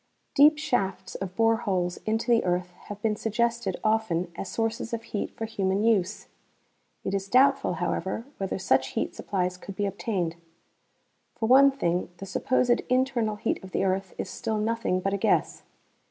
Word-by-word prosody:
Deep 300 +2 +6
shafts 195 -11 -1
of 185 -1 -5
bore 225 0 +3
holes 180 -5 -1
into 225 +2 0
the 230 - +4
earth 180 0 -1
have 205 -1 -7
been 215 -1 +2
suggested 235 +2 -1
often 215 -6 +1
as 185 - -5
sources 225 +1 -2
of 230 - -7
heat 220 -3 -3
for 225 - -2
human 200 -2 0
use. 210 -3 +1 0.8
It 190 - -2
is 195 0 -1
doubtful, 270 -2 +4
however, 190 +4 -2
whether 195 -1 -2
such 130 -8 +1
heat - - -1
supplies 180 -2 -2
could 195 +1 -9
be 205 - -1
obtained. 190 -4 -2 1.0
For 225 - -2
one 270 +4 +7
thing, 180 -10 -1
the 195 - -7
supposed 245 +4 +1
internal 255 -4 +1
heat 210 -1 -2
of 190 - -11
the - - +1
earth 190 0 -1
is - - -3
still 220 -1 -3
nothing 215 -3 0
but 195 +1 -1
a - - +1
guess. - - +1
210 Hz, 170 wpm, -27 LUFS, 190-230 Hz, 1.0 s, one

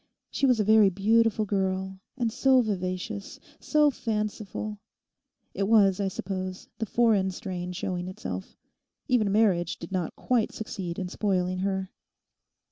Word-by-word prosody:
She 275 - +1
was 250 -3 +3
a - - +3
very 215 -1 +6
beautiful 215 +3 +2
girl, 190 -1 -1 0.2
and 235 -3 0
so 260 +2 +4
vivacious, 195 -1 -4 0.2
so 300 -1 +3
fanciful—it 210 -3 -5
was, 200 -4 +5
I 200 - +1
suppose 185 0 -5
the 225 - -2
foreign 215 -4 +3
strain 180 -2 -5
showing 180 0 -3
itself. 95 - -6 0.5
Even 220 -5 +2
marriage 195 -5 +2
did 170 - -9
not 180 -4 -2
quite 245 -3 0
succeed 190 -6 -5
in 185 - -3
spoiling 185 -2 -1
her. 190 0 -2
195 Hz, 130 wpm, -27 LUFS, 185-220 Hz, 0.5 s, very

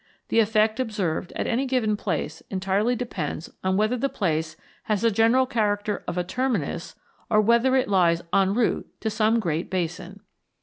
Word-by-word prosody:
The 230 - +3
effect 220 +1 +2
observed 200 -8 -2
at - - -2
any 260 +4 0
given 240 -5 +1
place 160 -6 -3
entirely 195 +5 0
depends 185 -10 -4
on 190 0 +1
whether 215 +4 +1
the 275 +3 0
place 160 -10 -2 0.3
has 210 -3 0
the 230 - +3
general 230 +5 +4
character 210 -4 -1
of 175 - -3
a 180 - +1
terminus, 190 - -2 0.3
or 215 - +4
whether 235 +4 +4
it 260 - +2
lies 175 -4 +3
en 195 0 +3
route 240 -1 0
to 220 - -1
some 220 +2 +2
great 170 -4 -2
basin. 180 +2 -4
210 Hz, 170 wpm, -25 LUFS, 185-230 Hz, 0.3 s, general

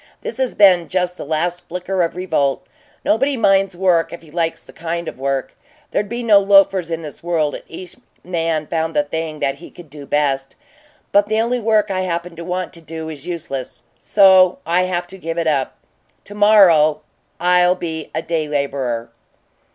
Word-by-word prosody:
"This 470 - -5
has 260 -2 -1
been 185 -4 +5
just 180 -1 -1
the - - -7
last 170 +4 -2
flicker 180 +2 -2
of 170 -1 -1
revolt. 155 -7 -1 0.4
Nobody 270 +5 +1
minds 195 -4 +2
work 180 -3 +2
if 170 - -9
he 155 - -16
likes 165 0 -2
the - - -16
kind 170 0 -4
of - - -7
work. 135 0 -2 0.4
There'd 205 - -1
be 240 +1 -4
no 210 -3 +6
loafers 195 -3 +4
in 165 0 -4
the 150 - -8
world 165 -4 0
if - - -7
each 175 +2 -10 0.3
man 165 -3 -1
found 160 0 -2
the 150 - +3
thing 155 +1 -5
that 135 0 0
he 170 - -12
could 170 -5 -15
do 145 -2 -10
best; 135 -2 0 0.6
but 205 0 +4
the 220 +1 0
only 240 +2 0
work 215 -2 +2
I 185 -1 -1
happen 175 -1 -3
to 170 - -6
want 180 +1 -4
to 170 - -9
do 160 0 -7
is 150 -1 -8
useless 155 -7 -6 0.2
so 190 -2 +5
I 175 +3 +2
have 175 -1 -2
to 190 +2 -12
give 165 -1 -5
it 170 - 0
up. 140 -4 0 0.5
To 205 - -11
morrow 185 -8 +5 0.4
I'll 180 0 +4
be 160 -3 -5
a 160 - -2
day 160 -2 -2
laborer." 135 -5 -2
170 Hz, 190 wpm, -19 LUFS, 155-190 Hz, 0.6 s, no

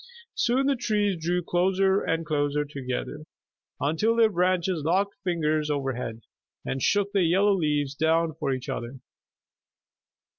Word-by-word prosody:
Soon 255 +3 +1
the 280 0 +2
trees 210 -5 0
drew 175 +1 0
closer 190 +3 +2
and 165 0 -1
closer 150 -1 0
together, 135 0 -5 0.6
until 160 - +1
their 225 -2 +4
branches 180 -2 +1
locked 190 +6 +1
fingers 155 -4 0
overhead 130 -5 -3 0.4
and 135 - -3
shook 200 +5 +1
the 200 - +2
yellow 190 +4 +3
leaves 150 -6 0
down 160 +2 +1
for 145 -2 -2
each 130 -1 -4
other. 120 +3 -5
165 Hz, 135 wpm, -26 LUFS, 145-195 Hz, 0.6 s, their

